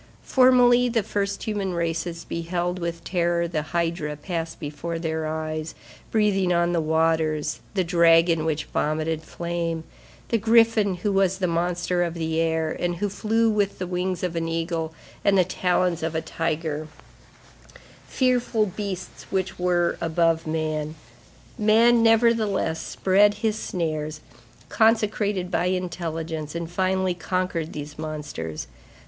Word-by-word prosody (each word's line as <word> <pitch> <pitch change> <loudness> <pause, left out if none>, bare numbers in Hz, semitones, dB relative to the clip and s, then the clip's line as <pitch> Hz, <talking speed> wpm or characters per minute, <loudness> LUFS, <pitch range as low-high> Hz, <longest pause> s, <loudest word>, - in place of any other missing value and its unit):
Formerly, 250 -1 +5
the 230 -2 +1
first 200 0 -2
human 200 -4 -2
races 170 0 -2
beheld 175 +2 -2
with 170 -1 -4
terror 170 -1 0
the 160 -2 -2
hydra 165 -1 -2
pass 165 +1 -4
before 155 +3 -5
their 160 -1 -2
eyes, 155 0 -4 0.3
breathing 200 -4 +2
on 175 0 +2
the 170 - +2
waters, 160 -1 +1 0.2
the 190 - +2
dragon 165 -1 +4
which 155 -1 -1
vomited 155 +1 -1
flame, 170 0 -3 0.5
the 230 - +2
griffin 225 -3 +4
who 190 +4 -1
was 195 -1 +2
the 190 - 0
monster 175 +1 0
of 170 -1 -1
the 160 -1 -1
air, 160 -1 +1
and 175 0 -1
who 205 +4 -1
flew 225 +3 +1
with 205 -2 0
the 185 - -3
wings 180 +1 -2
of 175 -2 -2
an 165 0 -1
eagle 165 -1 -2 0.3
and 200 -1 +4
the 185 - +6
talons 180 -1 0
of 160 0 -2
a - - +2
tiger; 155 -2 -3 1.2
fearful 245 -4 +1
beasts 190 -2 -6
which 190 -1 -2
were 175 -1 +1
above 165 0 +1
man. 155 -1 -2 0.6
Man, 230 +3 +5
nevertheless, 225 -7 +3
spread 205 +2 +3
his 215 -1 +2
snares, 155 -3 -3 0.5
consecrated 210 -4 +1
by - - +1
intelligence, 165 -4 -3
and 170 0 -4
finally 190 0 +1
conquered 175 -2 -2
these 150 0 -7
monsters. 150 - -5
170 Hz, 135 wpm, -24 LUFS, 160-195 Hz, 1.2 s, the